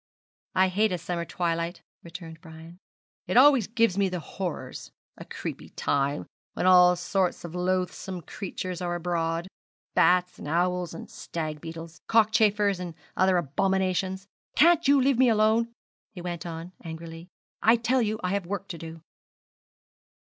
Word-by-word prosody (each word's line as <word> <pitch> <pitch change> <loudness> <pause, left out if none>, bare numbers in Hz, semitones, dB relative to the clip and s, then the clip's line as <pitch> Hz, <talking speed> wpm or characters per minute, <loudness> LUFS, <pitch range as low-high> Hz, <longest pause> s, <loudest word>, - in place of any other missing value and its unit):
'I 190 0 +5
hate 210 +3 +2
a 180 - 0
summer 170 0 -3
twilight,' 170 0 -2 0.2
returned 165 -1 -10
Brian; 165 +2 -12 0.5
'it - - +1
always 265 -5 +7
gives 225 -4 +2
me 195 -1 +3
the 180 -1 -3
horrors 180 +1 -6 0.3
a - - -9
creepy - - -7
time, 140 +1 -1 0.3
when - - -2
all 180 -1 +7
sorts 180 +1 -1
of 170 - -8
loathsome 180 0 -2
creatures 185 -1 -5
are 175 -1 -1
abroad 170 0 -1 0.5
bats, 180 0 +3
and - - -7
owls, 175 +1 0
and - - -8
stag 155 -2 -5
beetles, 165 0 -9
cockchafers, 210 -3 +3
and 175 -3 -6 0.2
other 185 -1 +3
abominations. 190 +4 0 0.3
Can't 335 -1 +5
you 280 0 +6
let 265 -1 +2
me 260 -2 +6
alone?' 220 +1 +3 0.4
he 205 - -11
went 175 -1 -5
on, 165 +1 -7
angrily. 165 +1 -8 0.3
'I 225 +2 +6
tell 240 +2 +1
you 215 -1 -1
I 180 - 0
have 195 -2 -1
work 195 0 -4
to 170 - -6
do.' 165 0 -9
180 Hz, 150 wpm, -27 LUFS, 170-200 Hz, 0.5 s, always